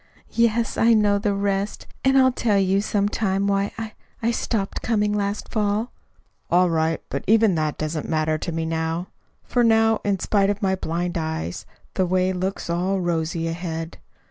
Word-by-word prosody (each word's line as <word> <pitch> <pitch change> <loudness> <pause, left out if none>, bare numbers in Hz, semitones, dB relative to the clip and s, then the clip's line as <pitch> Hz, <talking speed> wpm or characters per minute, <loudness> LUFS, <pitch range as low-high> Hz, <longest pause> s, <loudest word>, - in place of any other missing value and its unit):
"Yes, 230 0 +1
I 230 0 +5
know 205 -1 +3
the 205 -1 0
rest; 200 0 -1 0.2
and 265 0 +4
I'll 260 -1 +6
tell 220 -4 +1
you, 195 0 +2
some 205 -1 0
time, 200 -2 0
why 200 0 +1
I 220 -1 -5 0.3
I 230 - +2
stopped 215 -4 -2
coming 210 -2 +1
last 205 0 -2
fall." 215 +1 0 0.6
"All 180 0 +4
right; 160 0 +1
but - - -3
even 220 -1 +5
that 155 -2 -1
doesn't 155 0 -3
matter 155 -1 +1
to 170 - -4
me 165 0 -2
now; 160 +2 -2 0.3
for 245 - +1
now, 225 -1 +4
in 200 -1 +1
spite 195 +2 +1
of 205 0 -1
my 190 -2 +1
blind 175 -1 -2
eyes, 155 - -4 0.3
the 185 - +1
way 185 +1 +1
looks 185 +2 -3
all 180 +3 0
rosy 165 -1 -1
ahead. 165 -1 -5
195 Hz, 175 wpm, -23 LUFS, 165-210 Hz, 0.6 s, I'll